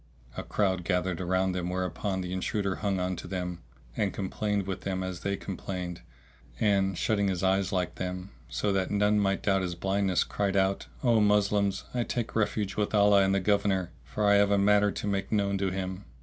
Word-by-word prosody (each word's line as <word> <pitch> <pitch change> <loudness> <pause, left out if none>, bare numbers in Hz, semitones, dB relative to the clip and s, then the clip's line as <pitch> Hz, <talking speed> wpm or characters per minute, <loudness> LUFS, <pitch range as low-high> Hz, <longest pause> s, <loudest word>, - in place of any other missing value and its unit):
A - - -3
crowd 95 -3 0
gathered 90 -1 0
around 95 +1 +1
them, 90 -1 -2
whereupon 95 +1 -2
the 90 0 -4
intruder 100 +1 -1
hung 100 -3 -1
on 90 0 -1
to - - -7
them; 90 -1 -4 0.4
and 100 -2 0
complained 100 +1 -2
with 95 -1 -4
them 95 -1 -2
as 95 -2 -4
they 100 +2 -2
complained, 90 -2 -5 0.6
and, 95 -3 +2
shutting 100 -2 +1
his 95 -2 -1
eyes 95 0 +2
like 90 -3 -1
them, 90 +1 -5 0.2
so 105 -1 0
that 95 -1 0
none 105 +1 +2
might 100 -1 0
doubt 95 -1 +2
his 90 -2 -3
blindness, 95 0 +1
cried 100 -1 -1
out, 95 0 +1 0.2
"O 120 -3 +4
Moslems, 105 -1 +2
I 120 -1 +1
take 120 -1 -3
refuge 105 -2 0
with 105 0 0
Allah 100 -1 +6
and 95 0 +3
the - - +3
Governor, 95 -2 +1
for 85 +11 -2
I 100 0 +6
have 100 0 +4
a 100 - +3
matter 105 +1 +4
to - - -5
make 100 -1 -1
known 100 -2 +1
to 95 -1 +1
him!" 95 +1 -4
95 Hz, 200 wpm, -28 LUFS, 95-100 Hz, 0.6 s, Allah